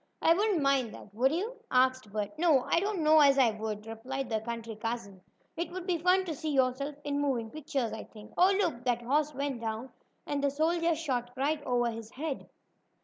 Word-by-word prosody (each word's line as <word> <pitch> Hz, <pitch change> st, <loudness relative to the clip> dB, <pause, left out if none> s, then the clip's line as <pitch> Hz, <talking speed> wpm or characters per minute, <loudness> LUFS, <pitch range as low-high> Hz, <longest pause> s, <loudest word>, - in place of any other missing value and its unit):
"I 330 Hz, -, +5 dB
wouldn't 390 Hz, -4 st, +1 dB
mind 270 Hz, -4 st, +2 dB
that, 205 Hz, -, -13 dB
would 255 Hz, +5 st, +3 dB
you?" 420 Hz, +10 st, -2 dB
asked 255 Hz, -3 st, +2 dB
Bert. 205 Hz, -1 st, -2 dB
"No, 315 Hz, -7 st, +4 dB
I -, -, +2 dB
don't 395 Hz, -2 st, -1 dB
know 310 Hz, +1 st, +6 dB
as 280 Hz, -2 st, +6 dB
I 250 Hz, -4 st, +5 dB
would," 215 Hz, -1 st, -5 dB
replied 250 Hz, +4 st, -5 dB
the 220 Hz, -1 st, 0 dB
country 230 Hz, -1 st, -5 dB
cousin. 215 Hz, -3 st, -5 dB, 0.3 s
"It 340 Hz, -, -3 dB
would 365 Hz, 0 st, -6 dB
be 355 Hz, -3 st, 0 dB
fun 365 Hz, +3 st, +3 dB
to 335 Hz, -, -3 dB
see 315 Hz, +1 st, -4 dB
yourself 275 Hz, +1 st, +1 dB
in 285 Hz, 0 st, -1 dB
moving 240 Hz, -6 st, -1 dB
pictures, 280 Hz, -6 st, -2 dB
I 220 Hz, -, -6 dB
think. 215 Hz, -1 st, -14 dB
Oh, 370 Hz, +2 st, +5 dB
look! 330 Hz, -11 st, 0 dB
That 240 Hz, -1 st, 0 dB
horse 290 Hz, +4 st, +1 dB
went 275 Hz, -3 st, -2 dB
down, 225 Hz, +3 st, -4 dB, 0.3 s
and 285 Hz, -1 st, -2 dB
the 280 Hz, -, +4 dB
soldier 330 Hz, +3 st, +1 dB
shot 260 Hz, -7 st, -2 dB
right 290 Hz, +3 st, 0 dB
over 240 Hz, -1 st, +1 dB
his 225 Hz, -1 st, -8 dB
head." 285 Hz, 0 st, -4 dB
270 Hz, 205 wpm, -30 LUFS, 235-315 Hz, 0.3 s, know